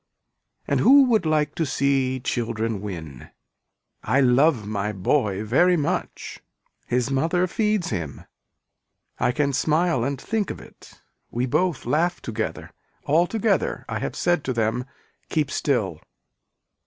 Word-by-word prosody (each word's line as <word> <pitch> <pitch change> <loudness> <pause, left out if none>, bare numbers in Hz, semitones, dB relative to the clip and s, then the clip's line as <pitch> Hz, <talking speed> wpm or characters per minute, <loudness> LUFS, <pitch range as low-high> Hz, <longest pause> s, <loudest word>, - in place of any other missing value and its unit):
And - - +1
who 275 +2 +7
would 220 -9 +2
like 150 -1 +1
to 165 - -1
see 135 -2 +1
children 115 -4 -2
win. 80 -10 -7 0.7
I 125 +6 +1
love 130 -2 +3
my 105 0 -2
boy 100 0 0
very 175 +11 +3
much. 145 - -3 0.5
His 125 +2 0
mother 165 +7 +1
feeds 210 - 0
him. 85 -9 -5 0.9
I - - +2
can 140 +2 0
smile 155 0 +1
and 135 +1 -2
think 220 +6 -2
of - - -5
it. - - -16 0.3
We 120 +2 -1
both 175 +6 0
laugh 175 +4 +1
together. 110 -1 -4 0.3
Altogether 195 +8 +1
I - - -3
have - - -4
said 175 -3 +1
to 130 - -1
them 115 +2 0 0.4
keep 150 -3 0
still. 105 - -1
135 Hz, 130 wpm, -24 LUFS, 115-170 Hz, 0.9 s, who